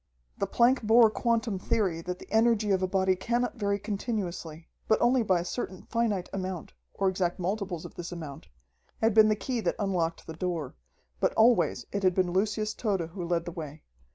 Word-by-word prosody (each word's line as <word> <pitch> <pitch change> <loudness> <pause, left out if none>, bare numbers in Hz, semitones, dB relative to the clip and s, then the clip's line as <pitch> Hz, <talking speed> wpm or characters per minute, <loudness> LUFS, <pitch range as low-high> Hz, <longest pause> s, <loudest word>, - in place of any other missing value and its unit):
The 200 - 0
Planck 240 +5 +4
Bohr 225 0 +5
quantum 230 -4 0
theory 185 -5 0
that 180 +1 -4
the - - -13
energy 220 -2 +3
of 190 -1 +2
a 185 - +1
body 190 0 +2
cannot 240 +6 -1
vary 200 -2 0
continuously, 195 -6 -4 0.2
but 220 - +3
only 245 +1 +4
by 185 -6 +2
a - - -6
certain 185 -2 -5
finite 225 -6 -1
amount, 185 -3 -4 0.2
or 195 - +1
exact 180 -2 0
multiples 185 -2 -3
of - - -9
this 175 +1 -7
amount, 155 -5 -8 0.5
had 225 -1 +3
been 220 0 +7
the 215 - +3
key 245 +3 -3
that - - 0
unlocked 180 -5 -1
the 160 - -7
door. 165 -4 -3 0.5
But - - +2
always 230 +2 +3
it 200 - -2
had 185 -2 +3
been 185 -2 +1
Lucius 215 +2 0
Tode 195 -7 -1
who 180 0 -6
led 170 -1 0
the 175 - -5
way. 155 -2 -8
195 Hz, 195 wpm, -28 LUFS, 175-220 Hz, 0.5 s, been